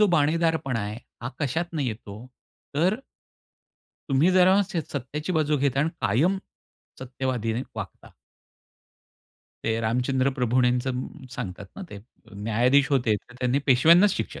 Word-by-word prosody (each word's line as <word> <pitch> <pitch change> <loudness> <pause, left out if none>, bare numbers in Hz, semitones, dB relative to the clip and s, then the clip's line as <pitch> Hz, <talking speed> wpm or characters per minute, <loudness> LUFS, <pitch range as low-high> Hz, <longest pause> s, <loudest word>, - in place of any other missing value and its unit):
जो 210 - +6
बाणेदारपणा 155 -5 +1
आहे. 105 +2 -4 0.2
हा 120 - -3
कशातनं 160 +2 -1
येतो? 110 -1 -6 0.5
तर 175 +7 +3 1.2
तुम्ही 145 +7 +4
जरा 185 +2 +5
स 190 -1 -7 0.2
सत्याची 150 +6 -4
बाजू 155 -2 +2
घेता 135 -1 0
आणि 155 - +2
कायम 155 - +2 0.6
सत्यवादीने 125 -2 -2
वागता. 100 -5 -8 1.5
ते 115 0 0
रामचंद्र 125 +4 +1
प्रभुणेच 125 0 +2 0.5
सांगतात 95 +1 -6
ना 200 - -6
ते, - - -8
अ, 100 -1 -17
न्यायाधीश 120 +7 +2
होते 125 -6 +2
तर 125 +4 -15
त्यांनी 125 +2 +2
पेशव्यांनाच 170 +10 +6
शिक्षा - - -4
130 Hz, 125 wpm, -25 LUFS, 115-155 Hz, 1.5 s, जो